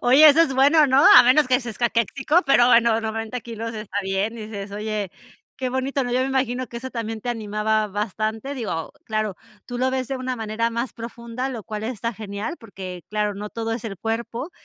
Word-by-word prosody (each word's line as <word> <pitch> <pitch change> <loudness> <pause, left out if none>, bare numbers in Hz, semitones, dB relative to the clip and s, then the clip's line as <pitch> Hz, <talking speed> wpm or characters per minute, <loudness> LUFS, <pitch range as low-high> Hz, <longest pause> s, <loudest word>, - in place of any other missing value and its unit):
Oye, 270 +6 +7
eso 300 +2 +6
es 280 -5 0
bueno, 290 +3 +5
¿no? 265 +3 +4
A - - +11
menos 255 +3 +5
que 255 +1 +3
seas 235 -4 -7
caquéxico, 255 - +1
pero 245 -3 +5
bueno 230 -2 +4
90 225 +2 -4
kilos 230 0 -6
está 215 -2 -7
bien 195 +4 -1
y 215 -1 -7
dices: 200 -2 -7
"Oye, 210 -2 -3 0.5
qué 260 -1 -2
bonito, 260 +2 -1
¿no?" 245 - -3
Yo 255 - +2
me 260 - +1
imagino 255 -1 -1
que 235 - -7
eso 260 +2 -7
también 225 -2 -4
te 245 - -6
animaba 215 -1 0
bastante. 215 +5 -3
Digo, 195 - -4
claro, 215 -3 -2 0.3
tú 245 -1 -5
lo 260 +1 +1
ves 260 -1 -2
de 270 - -2
una 255 -1 -3
manera 225 +1 -1
más 235 +2 -3
profunda, 235 +2 -5
lo 235 -5 -5
cual 215 0 -6
está 230 0 -3
genial, 210 - -5
porque 185 -5 -9
claro, 210 -1 -1
no 210 +1 -6
todo 225 0 -3
es 230 0 -4
el 200 -4 -5
cuerpo. 235 +6 -3
230 Hz, 215 wpm, -23 LUFS, 215-255 Hz, 0.5 s, A